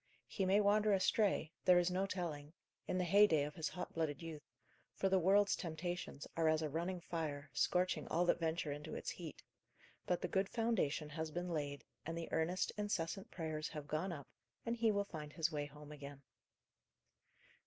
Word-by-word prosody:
He 190 -2 -1
may 195 +2 +5
wander 210 +1 +4
astray 195 -4 +2
there 180 -1 +7
is 175 +1 +3
no 190 +2 +1
telling 160 -6 -4 0.3
in - - 0
the 185 - +2
heyday 180 -4 +6
of 150 +1 -4
his 160 -3 -2
hot 180 - -6
blooded 155 -4 -1
youth, 160 -3 -6 0.5
for 195 - +1
the 190 0 +4
world's 200 +3 +5
temptations 175 -3 -4
are 165 -1 +3
as 155 0 +2
a 150 - -2
running 175 +3 -2
fire, 155 -4 -4
scorching 180 +9 +2
all 175 +2 +2
that 175 - +3
venture 160 -2 0
into 150 +2 -5
its - - -3
heat; 165 -4 -8 0.6
but 180 - +2
the 180 - -2
good 190 +2 +1
foundation 225 -11 +1
has 160 +1 -3
been 175 +3 -3
laid, 145 -4 -2 0.2
and 165 +2 -4
the 165 - -4
earnest, 170 +3 +1
incessant 195 -2 -1
prayers 155 -3 -3
have 150 -2 -6
gone 155 +5 -1
up, 145 -6 -6 0.4
and 230 0 0
he 225 -1 +4
will 200 -1 +1
find 150 -5 -7
his 165 0 +1
way 145 -1 -2
home 150 +1 -12
again. 140 -1 -9
165 Hz, 185 wpm, -38 LUFS, 150-185 Hz, 0.6 s, there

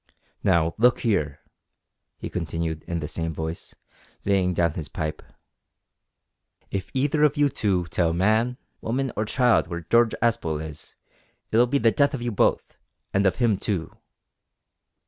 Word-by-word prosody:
"Now, 85 0 +3
look 120 +2 +4
here," 75 - 0 0.8
he - - -6
continued 80 -2 -3
in 85 -1 -3
the 75 - -3
same 80 0 -3
voice, 80 +2 -5 0.5
laying 95 -2 +2
down 85 -2 +2
his 80 -3 -6
pipe, 80 -1 -4 1.5
"if 95 -1 -3
either 145 +3 +2
of 150 0 +3
you 145 -1 +4
two 95 -8 0
tell 85 0 +1
man, 110 +8 +2 0.2
woman, 130 +3 -1
or 105 - -1
child 120 +2 +3
w'ere 85 -2 -6
George 115 -1 +4
Aspel 95 -9 0
is, 80 -1 -9 0.6
it'll 120 +3 +4
be 140 +3 +1
the 115 -4 +4
death 140 +2 +2
of 125 - -6
you 120 - -1
both, 100 - +1 0.4
and 100 0 +3
of 95 - +1
him 110 -2 +2
too." 95 -7 -3
100 Hz, 150 wpm, -25 LUFS, 80-120 Hz, 1.5 s, look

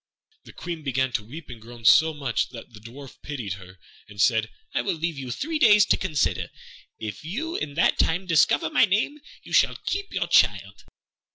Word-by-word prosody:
The - - -13
Queen 170 -2 -6
began 130 -2 -1
to 120 -4 -2
weep 145 +9 -10
and 120 -3 -10
groan 115 0 -12
so 160 +8 +6
much 140 -6 -2
that 120 -1 -11
the 105 - -12
Dwarf 125 +5 -12
pitied 125 -10 -5
her, 95 +1 -14 0.3
and 105 -1 -14
said, 110 0 +2 0.2
"I - - +1
will 195 -4 -1
leave 165 0 -3
you 130 -2 -6
three 310 - -3
days 210 -6 +6
to - - +3
consider; 155 -7 -1 0.5
if 110 +3 -7
you 290 - -4
in 145 -1 -4
that 165 - +2
time 180 +4 +1
discover 160 -2 +2
my - - +5
name 220 +9 0 0.2
you - - -11
shall - - +3
keep 400 0 -3
your - - -1
child." - - +2
145 Hz, 195 wpm, -25 LUFS, 115-180 Hz, 0.5 s, so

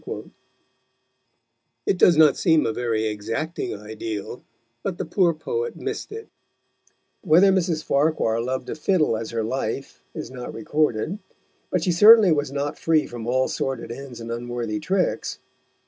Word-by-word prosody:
_ - - -6 1.5
It 180 - 0
does 170 -3 +6
not 155 -2 +6
seem 160 -4 +3
a 115 - 0
very 115 -2 -1
exacting 115 +11 -3
ideal, 105 +1 -6 0.4
but 180 +4 -3
the - - -3
poor 180 -4 +2
poet 460 - -3
missed - - -5
it. 445 +1 -8 0.9
Whether 185 +2 +5
Mrs. 175 -4 0
Farquhar 140 -6 +1
loved 130 +2 -3
a - - -1
fiddle 155 - +1
as 110 0 -4
her 115 -1 -2
life 125 +2 -4
is - - -6
not 125 -1 -7
recorded, 150 - -1 0.5
but - - 0
she 180 - +2
certainly 210 +2 +8
was 145 -3 0
not 140 +1 -3
free 160 -2 +2
from 120 -1 -7
all 130 +1 +2
sordid 130 -3 -3
ends 130 -1 -8
and 115 0 -6
unworthy 120 -2 -3
tricks. 190 - -1
140 Hz, 150 wpm, -23 LUFS, 115-170 Hz, 1.5 s, certainly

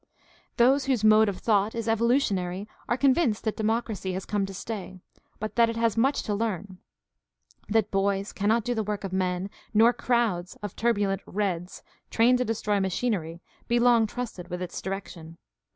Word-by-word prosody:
Those 265 +3 +4
whose 255 -6 0
mode 215 0 +6
of 195 - -4
thought 210 -1 +1
is 230 -1 -3
evolutionary 210 -5 +1 0.2
are 240 - +1
convinced 265 -4 +2
that 220 - -1
democracy 220 -3 -1
has 190 +1 -4
come 205 -2 -1
to - - -7
stay, 190 -3 -6 0.4
but 215 +1 -5
that 230 -1 +5
it 230 - -3
has 230 -2 +1
much 270 +5 +2
to 210 - -2
learn; 200 -3 -3 0.9
that 215 -1 +1
boys 195 0 0
cannot 215 +3 +1
do 245 +2 -1
the 220 - -1
work 210 -1 -3
of 190 -1 -5
men, 185 0 -1 0.3
nor 230 +3 +6
crowds 230 -7 0
of 205 - -5
turbulent 205 -4 0
"reds," 185 -3 -3 0.3
trained 245 +2 +4
to 250 - +1
destroy 210 -2 0
machinery, 190 -4 -2 0.2
be 240 - +2
long 235 -2 +4
trusted 210 -6 -6
with 180 0 -5
its 180 - -6
direction. 175 -4 -7
210 Hz, 170 wpm, -27 LUFS, 190-230 Hz, 0.9 s, mode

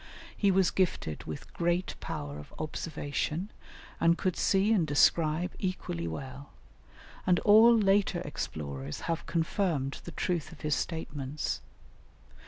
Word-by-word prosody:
He 200 - +2
was 190 -1 +4
gifted 175 - -1
with 80 -2 -7
great 175 +2 0
power 70 0 -5
of 75 - -12
observation, 155 +3 -3 0.5
and 170 +1 +4
could 185 -2 0
see 200 +3 +3
and 175 -7 +2
describe 155 +4 +3
equally 85 - -3
well; 130 - -7 0.8
and 180 -1 +5
all 225 +3 +7
later 195 -3 +3
explorers 75 - -5
have 165 -1 -3
confirmed 165 -4 0
the 175 - -8
truth 170 -2 -2
of 165 - -13
his 150 -1 0
statements. 145 -3 -3
165 Hz, 125 wpm, -30 LUFS, 140-185 Hz, 0.8 s, all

